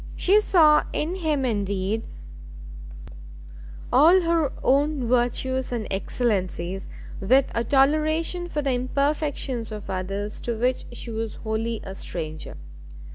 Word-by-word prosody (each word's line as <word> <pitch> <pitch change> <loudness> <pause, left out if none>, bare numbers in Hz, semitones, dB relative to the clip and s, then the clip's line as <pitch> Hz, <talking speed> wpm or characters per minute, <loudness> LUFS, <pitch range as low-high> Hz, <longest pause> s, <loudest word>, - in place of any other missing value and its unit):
She 400 +3 +4
saw 315 -7 +5
in 320 +4 -1
him, 305 -6 0
indeed, 205 -1 -1 1.9
all 325 +9 +7
her 330 -4 +1
own 280 -1 +2
virtues 250 +2 0
and 235 -3 -2
excellencies, 195 -3 -2 0.3
with 255 +7 +3
a 230 - 0
toleration 310 +7 +1
for 295 -3 -2
the 275 - +1
imperfections 265 -2 -1
of 210 -2 -6
others 195 +3 -3
to 235 -2 -3
which 250 +3 0
she 240 0 -8
was 225 -1 -4
wholly 225 0 -3
a 190 - -7
stranger. 155 - -6
250 Hz, 120 wpm, -24 LUFS, 215-300 Hz, 1.9 s, all